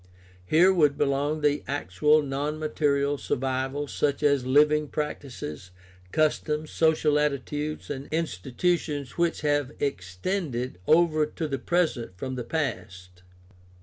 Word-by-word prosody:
— 90 0 -26
Here 180 - +5
would 150 -6 +3
belong 145 +2 0
the 145 -1 +1
actual 145 +4 +2
non 145 +2 -2
material 145 -2 0
survivals, 135 +2 -2
such 145 0 0
as 140 -3 +2
living 150 +2 +4
practices, 125 - -5 0.4
customs, 155 0 0
social 155 -2 +3
attitudes, 150 +1 -2
and 135 0 -5
institutions 150 - -2
which 170 -1 +1
have 145 -2 +1
extended 125 - -3
over 155 -2 +4
to 160 +1 -4
the 135 -2 -3
present 130 - -1
from 130 +8 -4
the 125 -1 -4
past. 90 - -4
145 Hz, 120 wpm, -26 LUFS, 130-155 Hz, 0.4 s, Here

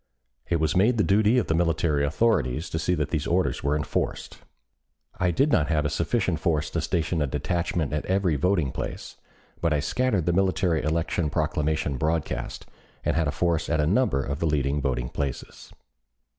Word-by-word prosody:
It 85 -1 +1
was 80 -1 0
made 110 +6 +3
the 105 - +3
duty 105 +4 +3
of 120 - +2
the - - 0
military 80 -3 +1
authorities 75 - +1
to 80 - -1
see 90 +3 +1
that 75 -3 -1
these 75 -3 -1
orders 90 +2 0
were 70 +1 +1
enforced. 75 - -3 0.8
I 90 - +2
did 135 - +2
not 75 - +3
have 75 -3 +1
a 75 - 0
sufficient 90 0 0
force 75 -2 0
to - - -1
station 80 0 -1
a 75 - +1
detachment 85 0 -2
at 75 - -2
every 95 -4 +1
voting 80 -3 +1
place, - - -6 0.4
but 85 -2 +2
I 75 - +1
scattered 100 - 0
the 85 - +1
military 90 -3 +1
election 80 +1 -1
proclamation 75 -1 -1
broadcast, 80 -4 -2 0.4
and - - +1
had 85 -2 +1
a - - 0
force 85 -1 0
at 80 - +1
a 75 - +3
number 90 - +2
of 70 +2 -4
the 85 - 0
leading 75 -1 0
voting 60 -3 -1
places. 70 -3 -5
80 Hz, 185 wpm, -25 LUFS, 75-90 Hz, 0.8 s, made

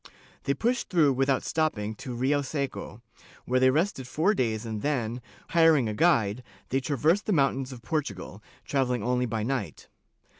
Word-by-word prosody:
They 140 - +1
pushed 240 +1 -1
through 160 -8 +4
without 135 +1 +1
stopping 115 -10 -1
to 125 -4 -6
Rioseco, 140 -3 -2 0.4
where 130 +1 +2
they 130 0 +5
rested 150 -2 0
four 160 +11 +2
days 115 - -1
and 110 -2 -4
then, 125 -5 -1 0.3
hiring 160 -7 +4
a 105 - -2
guide, 115 -6 +2 0.3
they 135 - +1
traversed 155 - +1
the 210 - +2
mountains 135 -3 +1
of 120 -2 -10
Portugal, 105 - -4 0.2
travel 135 -3 0
ling 120 -4 -2
only 125 0 +1
by 110 -1 -2
night. 125 -3 -4
130 Hz, 160 wpm, -27 LUFS, 120-155 Hz, 0.4 s, they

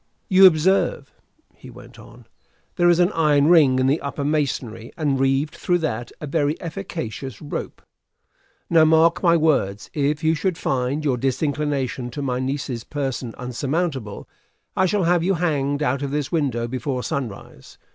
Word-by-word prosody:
"You 190 -1 +8
observe," 190 - +1 0.4
he - - -14
went - - -14
on, - - -15 0.5
"there 175 -1 +3
is 175 - +4
an 180 +2 +3
iron 150 -3 +3
ring 150 -7 +5
in 130 - +2
the 140 +4 +1
upper 140 0 -4
masonry, 135 -6 -2
and, 145 -5 0
reeved 135 +3 +1
through 175 - 0
that, 120 -8 -3
a - - -6
very 150 +1 -1
efficacious 160 - -6
rope. 145 - -6 0.8
Now, 165 -2 +5
mark 160 +2 +4
my 170 -2 +4
words: 135 -11 0
if 145 +1 -1
you 160 0 +3
should 165 +2 -1
find 135 +1 -1
your 130 -4 +1
disinclination 135 -1 -2
to 145 - -4
my 125 -2 -1
niece's 130 -3 -3
person 135 -5 -4
insurmountable, 130 - -3 0.5
I 190 - +3
shall 200 +1 0
have 175 0 +3
you 190 +3 +1
hanged 145 -4 -1
out 135 0 0
of 140 - -2
this 145 -1 -3
window 130 -8 -1
before 130 +1 -3
sunrise. 120 -8 -6
145 Hz, 160 wpm, -22 LUFS, 130-165 Hz, 0.8 s, You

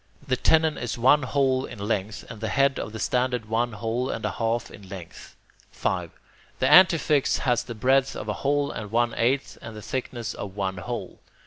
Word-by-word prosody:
The 130 - +2
tenon 160 +4 +3
is 120 -1 -3
one 135 +5 +5
hole 130 -1 +1
in - - -8
length, 105 0 -3
and 110 - -10
the 110 - -2
head 135 +4 +2
of - - -5
the 110 - -7
standard 125 +2 0
one 115 +2 0
hole 115 +4 -2
and - - -3
a - - 0
half 115 0 -2
in 100 -2 -13
length. 90 -4 -10 0.3
5. - - -2 0.5
The - - 0
antefix 150 -2 +5
has 125 -2 +1
the 120 - -8
breadth 130 +4 +2
of - - -6
a 105 - 0
hole 145 +1 +1
and 105 -1 -6
one 120 +2 +1
eighth, 130 +4 0
and 115 - -9
the 105 - -8
thickness 120 -3 -4
of 100 -2 -7
one 95 -2 -2
hole. 90 - -6
120 Hz, 200 wpm, -25 LUFS, 110-135 Hz, 0.5 s, one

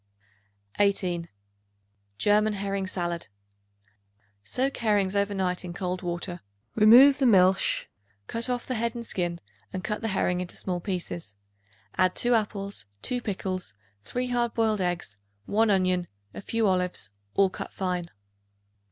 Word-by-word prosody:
18. 180 -4 +1 0.9
German 210 +1 +3
Herring 195 -1 -2
Salad. 175 -2 -3 1.1
Soak 260 - -1
herrings 205 -4 +2
over 200 0 +1
night 180 -1 -1
in 175 -1 -6
cold 180 -1 -3
water; 175 0 -3 0.3
remove 255 +7 +8
the 265 - +4
milch; 190 -3 +4 0.4
cut 230 - -2
off 245 -1 -1
the 255 - -2
head 235 0 -1
and 235 -1 -5
skin 175 -5 -2 0.3
and 185 - -5
cut 210 -1 -2
the 225 - -1
herring 180 -3 +1
into 180 - -5
small 180 -2 -2
pieces; 175 - -4 0.6
add 185 -1 +4
2 245 0 +2
apples, 200 - -1 0.2
2 245 -1 -1
pickles, 185 - -4 0.3
3 250 - -3
hard 240 -1 0
boiled 220 -3 +2
eggs, 175 - -2 0.3
1 220 - +2
onion, 185 -2 +2 0.3
a - - -7
few 225 +2 0
olives, 180 - 0 0.2
all 195 -1 +4
cut - - -6
fine. 180 -2 -2
195 Hz, 140 wpm, -27 LUFS, 180-220 Hz, 1.1 s, remove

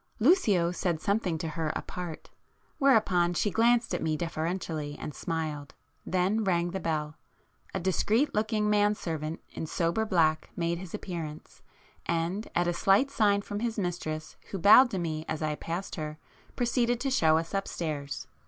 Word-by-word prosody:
Lucio 215 - +4
said 175 -2 -1
something 200 -3 0
to 160 0 -3
her 155 0 -2
apart,—whereupon 180 - -1
she 205 - +1
glanced 235 +2 +3
at - - -1
me 155 -1 0
deferentially 160 -2 -3
and 150 - -6
smiled,—then 165 +6 -3
rang 175 -3 +1
the 190 - -3
bell. 155 -3 -2 0.6
A - - 0
discreet 210 - +1
looking 215 0 +1
man 210 0 +3
servant 160 -4 -4
in 160 - -5
sober 170 +7 0
black 160 -7 +2
made 170 0 -1
his 185 -2 -7
appearance, 160 -4 -7 0.5
and 170 +6 -1
at 175 - +3
a 175 - +1
slight 195 +10 +3
sign 205 -6 +2
from 205 0 -4
his 230 0 -2
mistress 155 -5 -3
who 195 - -4
bowed 215 +8 +8
to 195 - -3
me 160 -3 -2
as 160 0 -2
I 155 -1 0
passed 170 +5 -5
her, 155 -1 -4 0.4
proceeded 240 -1 +1
to 270 - 0
show 160 -11 +4
us 165 +3 -3
upstairs. 155 -7 -3
175 Hz, 155 wpm, -29 LUFS, 160-210 Hz, 0.6 s, bowed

